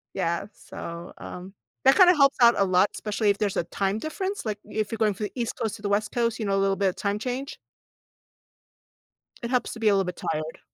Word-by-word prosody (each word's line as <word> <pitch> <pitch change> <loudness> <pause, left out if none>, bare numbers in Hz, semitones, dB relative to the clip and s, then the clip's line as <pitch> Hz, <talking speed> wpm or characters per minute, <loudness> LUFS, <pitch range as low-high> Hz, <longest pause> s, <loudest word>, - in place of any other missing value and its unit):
Yeah, 170 +3 -1
so, 170 -2 -8
um, 185 +2 -9 0.3
that 270 - +7
kinda 365 -2 +7
helps 275 -2 +4
out 235 0 +7
a 200 - +4
lot, 185 +1 +3
especially 210 0 -1
if 200 - +2
there's 205 -2 -1
a - - +1
time 195 +3 -1
difference, 380 - -4
like 210 -2 -2
if 215 0 -3
you're 225 - -3
going 215 -2 +2
from 210 +2 -4
the - - -6
East 235 -1 -2
Coast 220 -1 -1
to - - -16
the 205 - -2
West 210 +1 0
Coast, 230 -1 0
you 220 - -2
know, 200 -1 +1
a - - +2
little 195 0 +2
bit 195 0 +2
of 180 - -6
time 200 0 -2
change. 255 +5 -4 1.9
It 235 - -3
helps 250 -1 0
to 230 - -9
be 225 - +1
a 210 - +6
little 195 -1 +2
bit 180 0 -6
tired. 155 0 -4
210 Hz, 240 wpm, -26 LUFS, 195-235 Hz, 1.9 s, that